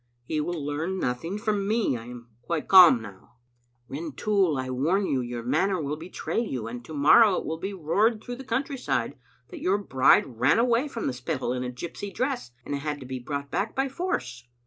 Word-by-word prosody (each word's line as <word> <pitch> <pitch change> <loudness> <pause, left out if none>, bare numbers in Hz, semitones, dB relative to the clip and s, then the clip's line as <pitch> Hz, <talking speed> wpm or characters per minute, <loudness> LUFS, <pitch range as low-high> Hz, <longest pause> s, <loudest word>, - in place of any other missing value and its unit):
" 120 - -45
He 155 +3 -1
will 175 +2 -3
learn 160 +6 -2
nothing 165 +6 -2
from 210 -2 -1
me. 215 - +1
I 115 -1 -7
am 120 -1 -10
quite 155 +5 -3
calm 175 -11 +8
now." 100 +1 -13 0.3
" 120 0 -43
Rintoul, 165 +4 0
I 130 0 -3
warn 165 +10 +1
you 135 -7 0
your 120 -1 -5
manner 190 +10 +1
will 150 -1 -2
betray 170 +8 -4
you, 135 - -3
and 120 +1 -7
to 160 - -9
morrow 185 +9 +6
it - - -3
will 160 +1 -4
be 195 +3 -4
roared 210 +7 +1
through 245 0 -6
the 265 - -8
country 265 +2 -2
side 135 - -1 0.3
that - - -9
your 190 +2 +2
bride 130 - +3
ran 125 - +4
away 240 +3 +2
from 235 -5 -5
the 130 - -1
Spittal 125 0 -3
in 125 0 -3
a 125 - -3
gypsy 170 +10 -7
dress, 255 - -2 0.2
and - - -4
had 150 +1 -4
to - - -8
be 130 0 -5
brought 140 +2 -5
back 200 +3 -2
by 270 +1 +1
force." 125 - -4
155 Hz, 215 wpm, -26 LUFS, 125-205 Hz, 0.3 s, calm